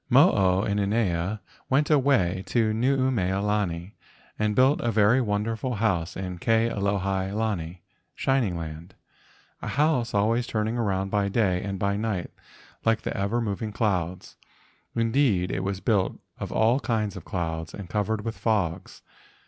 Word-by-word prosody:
Mo - - +7
o 95 0 +2
inanea 100 -2 0 0.3
went 140 +3 +2
away 130 -11 +3
to 110 -3 +1
Nuumea 120 -6 +1
lani 100 -3 -1 0.5
and 105 -1 +1
built 130 +3 +4
a 120 - 0
very 110 +4 +4
wonderful 110 +3 -1
house 95 -6 0
in 90 -2 -5
Ke 115 +3 +2
alohi 100 -1 -1
lani 95 -6 -3 0.3
(shining 125 -10 +1
land), 80 +1 -7 0.7
a - - -5
house 135 -6 +1
always 115 +4 +2
turning 110 +1 -1
around 95 -4 -1
by 100 -1 +1
day 95 -4 +1
and 100 -1 -4
by 100 +1 0
night 105 -4 -2 0.5
like 115 -1 +2
the - - -3
ever 100 +5 0
moving 110 -1 -3
clouds, 95 -4 -2 0.6
indeed, 115 -5 +2
it 95 - -2
was 95 0 -2
built 105 -6 +1 0.2
of - - -5
all 115 +4 +3
kinds 110 -5 -1
of 95 - -8
clouds 80 -3 -3
and 100 -3 -8
covered 105 +2 -1
with 115 0 -3
fogs. 95 -5 -2
105 Hz, 150 wpm, -26 LUFS, 95-115 Hz, 0.7 s, Mo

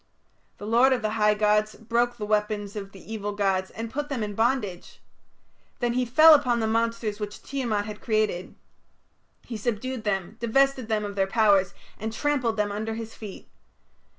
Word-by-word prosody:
The 205 - -8
lord 240 +5 +4
of 245 -3 -2
the 215 - 0
high 210 -1 +3
gods 210 0 +2
broke 240 +2 0
the 210 - -4
weapons 210 -1 -1
of 195 -2 -6
the 195 +3 -10
evil 205 -1 -3
gods 195 -2 0
and 225 +1 -6
put 295 +1 -3
them 260 -6 -2
in 205 -1 -4
bondage. 220 -5 -1 0.8
Then 240 -1 0
he 250 0 +1
fell 310 +7 +8
upon 250 -5 +3
the 225 - 0
monsters 230 -1 -1
which 210 -1 -6
Tiamat 235 -7 -2
had 210 -1 -8
created; 215 -5 -1 0.9
he 230 - -5
subdued 240 +2 -3
them, 200 0 -2
divested 260 +1 +2
them 215 -2 0
of 200 -1 -6
their 195 -1 +1
powers, 200 -3 +3 0.2
and 220 +1 -3
trampled 250 -2 0
them 210 -1 0
under 220 +2 -3
his 225 0 -7
feet. 210 -3 -10
220 Hz, 180 wpm, -26 LUFS, 205-240 Hz, 0.9 s, fell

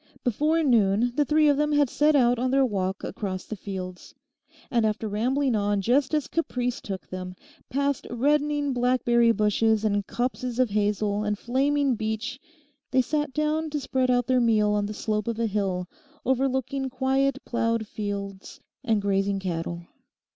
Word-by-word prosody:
Before 300 +7 +1
noon 230 -2 +3
the 295 - +2
three 305 +1 +3
of 290 -1 +4
them 300 0 +1
had 290 -1 +4
set 300 +4 +2
out 245 -3 +4
on 255 +1 0
their 270 +1 +3
walk 190 -4 -2
across 185 -3 -4
the 215 - -5
fields. 185 -3 -7 0.6
And 235 -2 +2
after 220 0 0
rambling 250 +5 0
on 205 -1 +1
just 260 +8 +2
as 300 -3 0
caprice 250 -7 -2
took 195 -2 -6
them, 185 0 -6 0.3
past 280 0 -1
reddening 290 +3 +1
blackberry 240 -1 +3
bushes 220 0 +2
and 205 -2 0
copses 250 0 -2
of 255 -4 +2
hazel, 205 0 0
and 210 0 -1
flaming 275 +4 +1
beech, 220 +3 -3 0.5
they 260 -1 +3
sat 295 +2 -1
down 305 +2 0
to 300 0 -2
spread 260 -2 0
out 245 -1 +2
their 255 0 +2
meal 215 -3 +3
on 205 -1 0
the 210 - -6
slope 215 0 -2
of 230 -1 -2
a 230 - 0
hill, 195 -4 -1 0.4
overlooking 265 +1 0
quiet 265 +1 +1
ploughed 230 -1 0
fields 200 -2 -6 0.2
and 220 -5 +1
grazing 195 0 +1
cattle. 170 -2 -4
235 Hz, 165 wpm, -26 LUFS, 205-270 Hz, 0.6 s, of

